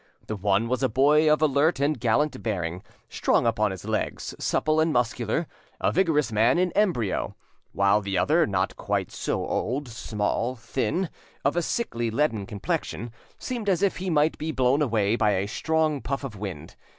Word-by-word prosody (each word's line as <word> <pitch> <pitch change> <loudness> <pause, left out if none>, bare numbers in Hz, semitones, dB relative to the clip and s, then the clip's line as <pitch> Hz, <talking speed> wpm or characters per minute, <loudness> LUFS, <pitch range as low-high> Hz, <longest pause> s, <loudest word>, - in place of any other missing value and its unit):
The 110 - -4
one 100 +2 +1
was 125 +1 -1
a 130 - +2
boy 150 +6 +4
of 155 +1 +3
alert 150 +2 +3
and 145 -1 +1
gallant 130 +6 +1
bearing, 90 -5 -3 0.3
strong - - +1
upon 110 -2 +2
his 95 -2 -7
legs, - - -2
supple 155 0 +1
and 160 +1 +3
muscular, 120 +3 0 0.3
a - - +1
vigorous 155 -9 +2
man 115 +6 +3
in 180 0 +2
embryo; 170 - 0 0.4
while 100 +1 +3
the 100 -2 -2
other, 155 - +3
not 95 -2 -1
quite - - -2
so - - -2
old, 135 +3 -2
small, 115 +2 -2
thin, 120 - -2 0.3
of 140 - +2
a 175 - +2
sickly 120 - -2
leaden 115 -5 0
complexion, 110 +1 -3 0.3
seemed 235 -5 -3
as 185 0 +1
if 200 - +2
he 185 0 -3
might 155 -1 +2
be 160 +1 -2
blown 130 +1 +2
away 110 -6 +2
by 105 -3 +2
a 95 0 0
strong 155 +4 0
puff 140 +1 -3
of 130 -6 -6
wind. 90 -6 -7
125 Hz, 175 wpm, -26 LUFS, 105-155 Hz, 0.4 s, boy